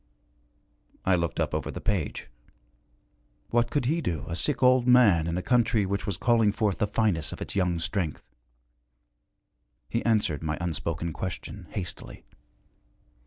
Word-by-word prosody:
I 95 - +4
looked 85 -2 -2
up 80 -2 0
over 75 -2 -2
the - - -5
page. 95 -9 -2 1.2
What 120 0 +2
could 145 -4 0
he 160 +6 +1
do, 85 - -3
a 80 - -3
sick 140 - -1
old 125 -1 +5
man, 105 -10 +5
in 85 +1 -1
a 90 - -2
country 115 -4 +2
which 100 +2 -2
was 100 -5 -2
calling 115 -3 +3
forth 100 -2 -1
the 105 - +2
finest 100 -7 0
of - - -9
its - - -5
young 90 -3 +1
strength? 85 -2 -2 1.7
He 115 - 0
answered 105 -9 +1
my 80 -1 -2
unspoken 85 0 -3
question, 95 +1 -6
hastily. 90 -3 -6
95 Hz, 150 wpm, -27 LUFS, 85-115 Hz, 1.7 s, old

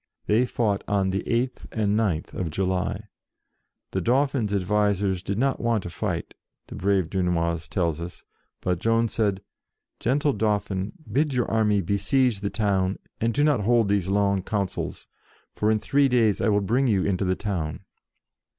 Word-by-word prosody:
They 115 +4 +3
fought 105 -5 0
on 100 -2 +1
the 95 - -1
8th 125 +2 -1
and 105 -2 0
pth 100 -8 0
of 90 -3 -3
July. 95 +4 -1 0.9
The 95 - -1
Dauphin's 130 0 +1
advisers 100 -1 +1
did 100 +2 -3
not 135 +3 +1
want 115 -4 0
to 90 - -6
fight, - - -3 0.3
the - - -11
brave 95 -3 +1
Dunois 85 -3 -1
tells 85 -4 -1
us, 85 +1 -8 0.4
but 90 -1 0
Joan 115 +2 +2
said, 100 -4 0 0.3
" - - -57
Gentle 140 +4 +1
Dauphin, 105 -2 -1 0.2
bid 140 +3 +1
your 125 - +2
army 105 -2 +2
besiege 100 +5 +1
the 100 0 -2
town, 100 -3 0 0.2
and 115 +1 +1
do 145 +5 +1
not 150 -5 +3
hold 115 0 +2
these 100 -3 +1
long 100 0 +2
councils, 100 -1 -3 0.5
for 105 - 0
in 110 - +3
three 140 +6 +2
days 115 -5 +2
I 115 - +2
will 105 -1 +3
bring 120 +7 +1
you 100 -5 +2
into 100 -1 0
the 95 -1 +1
68 100 - -9
JOAN 105 - 0
OF 90 - 0
ARC 75 0 -3
town." 100 - -15
100 Hz, 180 wpm, -25 LUFS, 95-115 Hz, 0.9 s, They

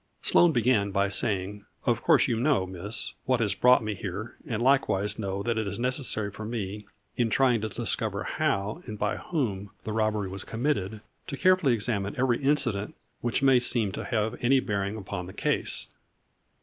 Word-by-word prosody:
Sloane 175 -1 +5
began 120 -6 +2
by 100 0 +1
saying: 100 -1 -2
" - - -33
Of - - +2
course - - +4
you 115 - 0
know, 130 -7 +2
Miss, 95 +5 -5
what 130 -2 +2
has 105 -4 +1
brought 125 +3 +5
me 105 -1 -2
here, 100 +4 -6
and 110 -3 -2
likewise 110 -6 +2
know 100 -1 -2
that 115 0 0
it 110 - -2
is - - -3
necessary 125 -4 -1
for 110 - -8
me, 105 -2 -4 0.3
in 120 -2 +2
trying 125 -1 +3
to 110 - -2
discover - - -2
how, 100 +2 -1
and 105 - -5
by 105 0 -1
whom 105 - -2
the 110 - -4
robbery 110 -2 0
was 95 0 -6
committed, 115 -5 -2 0.3
to 140 - -5
carefully 185 -7 +4
examine 105 -3 -2
every 125 -1 +2
incident 135 -8 0 0.2
which 120 +3 -1
may 135 -2 +6
seem 120 -4 0
to - - -5
have 110 -1 -1
any 130 +2 +5
bearing 100 -3 -2
upon 95 -3 -5
the 95 - -9
case." - - -1
110 Hz, 185 wpm, -27 LUFS, 100-125 Hz, 0.3 s, may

